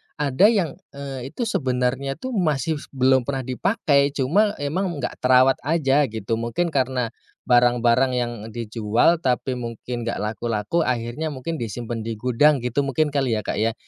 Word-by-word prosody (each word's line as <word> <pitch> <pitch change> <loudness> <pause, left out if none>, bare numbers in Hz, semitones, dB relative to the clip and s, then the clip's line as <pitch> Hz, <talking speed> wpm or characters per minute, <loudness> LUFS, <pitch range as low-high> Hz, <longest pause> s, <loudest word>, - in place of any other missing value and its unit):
ada 145 +5 +3
yang, 190 -6 0 0.2
eee, 135 -2 -6
itu 240 - -2
sebenarnya 135 - -1
tuh 260 +9 -6
masih 155 - 0 0.2
belum 130 -1 +3
pernah 135 -2 -2
dipakai, 140 - +1
cuma 200 +11 +2
emang 160 +7 -2 0.2
nggak - - -4
terawat 130 +1 +4
aja 145 -3 +2
gitu. 110 0 -3
Mungkin 120 +9 -1
karna 130 -4 0 0.3
barang-barang 120 +1 +3
yang 120 -1 -1 0.2
dijual 115 +6 +1
tapi 130 -3 -1
mungkin 120 0 -5
nggak 115 - -3
laku-laku, 110 - -1
akhirnya 125 +5 -2
mungkin 160 +5 -4
disimpen 115 -1 -5
di 115 - -2
gudang 125 +5 +2
gitu 125 +3 -1
mungkin 150 +3 +1
kali 135 -5 0
ya, 105 - 0
Kak, - - -4
ya. 110 +2 +1
130 Hz, 155 wpm, -23 LUFS, 120-145 Hz, 0.3 s, terawat